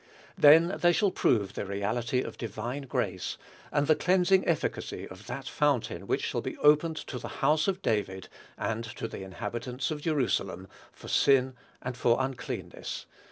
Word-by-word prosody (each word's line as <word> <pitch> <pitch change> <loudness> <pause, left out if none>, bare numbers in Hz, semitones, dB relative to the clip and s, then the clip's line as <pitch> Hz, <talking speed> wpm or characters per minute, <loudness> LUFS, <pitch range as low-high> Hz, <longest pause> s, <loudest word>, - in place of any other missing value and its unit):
Then 165 +5 +6
they 175 0 +5
shall 200 +2 +2
prove 105 - +1
the - - -3
reality 105 +6 -1
of - - -6
divine 120 +5 -5
grace, 95 -6 -2 0.3
and 145 0 +2
the 155 - +5
cleansing 185 +2 +3
efficacy 170 - -1
of - - -12
that - - -5
"fountain 145 -5 0
which - - 0
shall - - -1
be - - -5
opened 150 +2 +4
to 125 - -5
the - - -6 0.2
house 155 0 +3
of 195 0 -1
David, 95 - -1 0.3
and 115 +1 -2
to 115 0 -5
the 110 - -8
inhabitants 120 +7 -4
of 150 -1 -4
Jerusalem, 120 - 0 0.2
for - - -13
sin 130 -1 +4 0.3
and 125 0 -3
for 120 -1 +3
uncleanness." 130 -1 -4
125 Hz, 160 wpm, -29 LUFS, 110-155 Hz, 0.3 s, Then